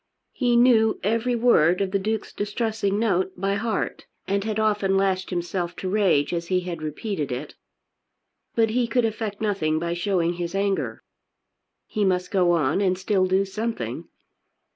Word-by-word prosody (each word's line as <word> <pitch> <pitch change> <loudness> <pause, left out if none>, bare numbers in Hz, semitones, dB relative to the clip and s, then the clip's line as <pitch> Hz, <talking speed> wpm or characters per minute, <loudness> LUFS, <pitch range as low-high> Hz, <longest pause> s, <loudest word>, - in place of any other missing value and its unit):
He 245 -2 +1
knew 235 -3 +4
every 230 +4 +1
word 180 -8 +4
of 195 -1 -1
the 200 - +1
Duke's 215 +2 -3
distressing 210 -1 -1
note 190 -4 0
by 195 +1 0
heart, 215 +1 -2 0.2
and 200 0 0
had 220 0 -2
often 205 -3 +2
lashed 190 -1 0
himself 175 0 -3
to 190 - -5
rage 185 -7 +2
as 170 0 -2
he 185 0 +1
had 175 -3 -5
repeated 155 - -3
it. 125 - -5 1.0
But 225 -1 +3
he 240 +1 +1
could 235 +1 +1
effect 215 -2 -3
nothing 195 -8 0
by 170 +1 -2
showing 175 -1 0
his 175 +1 -4
anger. 195 0 -1 0.8
He 210 - -2
must 180 -2 0
go 180 -3 +3
on 155 +2 +1
and 185 -2 +2
still 190 0 +1
do 190 +1 +2
something. 220 +4 -4
195 Hz, 165 wpm, -24 LUFS, 180-220 Hz, 1.0 s, knew